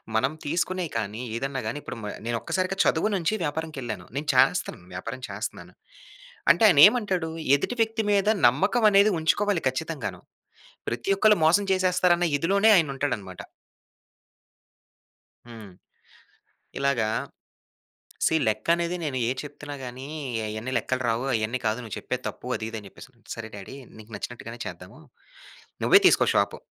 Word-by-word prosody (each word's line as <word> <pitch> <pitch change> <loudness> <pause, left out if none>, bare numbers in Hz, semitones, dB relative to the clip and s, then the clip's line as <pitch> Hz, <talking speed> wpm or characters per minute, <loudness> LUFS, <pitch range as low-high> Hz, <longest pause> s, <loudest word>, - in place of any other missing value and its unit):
మనం 130 +6 +2
తీసుకునేయి 175 +2 -1
కానీ, 110 +1 -4
ఏదన్నా 135 +2 -3
గానీ, 115 - -3
ఇప్పుడు - - -7
మ - - -5 0.2
నేనొక్కసారిగా 185 +11 -2
చదువు 165 +7 +2
నుంచి 175 +1 0
వ్యాపారానికెళ్ళాను. 140 - -4
నేను 150 +1 -3
చేస్తన్నాను, - - +2
వ్యాపారం - - -6
చేస్తున్నాను. - - -6 0.8
అంటే, - - +2
ఆయనేమంటాడు? 190 - +5 0.3
ఎదుటి 245 - -4
వ్యక్తి 225 0 0
మీద 200 0 +2 0.2
నమ్మకవనేది 200 - +4
ఉంచుకోవాలి 185 +3 +1
ఖచ్చితంగాను. 155 +3 -5 0.7
ప్రతి 120 +9 -4
ఒక్కళ్ళు 210 0 +4
మోసం 175 +6 +4
చేసేస్తారన్న 180 -1 +2
ఇదిలోనే 200 +8 +3
ఆయనుంటాడనమాట. 135 - -2 2.0
హ్మ్. 110 -4 -11 1.1
ఇలాగా 135 -5 +1 1.2
సీ - - +3
లెక్కనేది, 170 +11 0
నేనేది 130 -5 -1
చెప్తున్నా 145 0 -8
గానీ, 125 +2 -8 0.4
అయన్నీ 110 +4 -5
లెక్కలు 130 0 -2
రావు, 115 +3 0
అయన్నీ 115 +2 -1
కాదు, 110 +1 +1
నువ్వు 110 - -6
చెప్పేది 125 0 -4
తప్పు, - - -7
అదీ 110 - -4
ఇదీ 115 - -6
అని 100 - -12
చెప్పేసిసన్నాడు. 120 +3 -17
సరే 115 -1 -7
డ్యాడీ 100 +6 -9 0.2
నీకు 110 +1 -14
నచ్చినట్టుగానే 115 +2 -7
చేద్దాము. - - -9 0.8
నువ్వే - - +7
తీసుకో - - +4
షాపు. - - +1
145 Hz, 125 wpm, -25 LUFS, 115-180 Hz, 2.0 s, నువ్వే